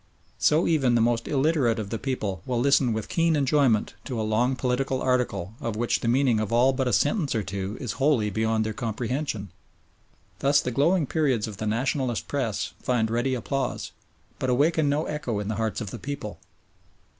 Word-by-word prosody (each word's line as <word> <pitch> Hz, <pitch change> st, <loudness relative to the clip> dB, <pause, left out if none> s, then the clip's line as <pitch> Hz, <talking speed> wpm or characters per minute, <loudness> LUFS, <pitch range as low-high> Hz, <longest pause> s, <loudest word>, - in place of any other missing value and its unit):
So 155 Hz, +3 st, +3 dB
even 135 Hz, -7 st, +2 dB
the -, -, +4 dB
most 115 Hz, 0 st, +1 dB
illiterate 140 Hz, -5 st, +2 dB
of 105 Hz, -3 st, -5 dB
the 115 Hz, -, -2 dB
people 105 Hz, -10 st, -3 dB
will 125 Hz, -2 st, 0 dB
listen 135 Hz, -1 st, +3 dB
with 110 Hz, -1 st, -3 dB
keen 165 Hz, -1 st, +2 dB
enjoyment 135 Hz, -6 st, +2 dB
to 125 Hz, -4 st, -3 dB
a -, -, 0 dB
long 115 Hz, +5 st, +1 dB
political 130 Hz, +1 st, -1 dB
article 125 Hz, -7 st, 0 dB
of 115 Hz, -2 st, -3 dB
which 120 Hz, +2 st, 0 dB
the -, -, -3 dB
meaning 125 Hz, -2 st, +3 dB
of 110 Hz, -1 st, -2 dB
all 125 Hz, +3 st, +4 dB
but 130 Hz, -1 st, -1 dB
a -, -, +1 dB
sentence 145 Hz, -, +1 dB
or 110 Hz, -, 0 dB
two 95 Hz, +2 st, -4 dB
is 125 Hz, -, -3 dB
wholly 135 Hz, -6 st, +1 dB
beyond 110 Hz, +1 st, 0 dB
their 110 Hz, -, -2 dB
comprehension. 120 Hz, -2 st, -3 dB, 0.9 s
Thus 140 Hz, +1 st, +4 dB
the 125 Hz, -, -2 dB
glowing 160 Hz, +6 st, +2 dB
periods 135 Hz, -7 st, 0 dB
of 105 Hz, -3 st, -8 dB
the 110 Hz, -, -3 dB
Nationalist 125 Hz, +2 st, -1 dB
Press 125 Hz, -8 st, -2 dB
find 115 Hz, -3 st, 0 dB
ready 120 Hz, +3 st, 0 dB
applause, 135 Hz, +3 st, -3 dB, 0.5 s
but 130 Hz, -, -1 dB
awaken 145 Hz, +4 st, +2 dB
no 150 Hz, +2 st, 0 dB
echo 150 Hz, -8 st, -3 dB
in 105 Hz, 0 st, -4 dB
the 110 Hz, -, -1 dB
hearts 110 Hz, +1 st, -1 dB
of 105 Hz, -3 st, -5 dB
the 120 Hz, -, -7 dB
people. 140 Hz, -4 st, -6 dB
125 Hz, 190 wpm, -26 LUFS, 110-140 Hz, 0.9 s, the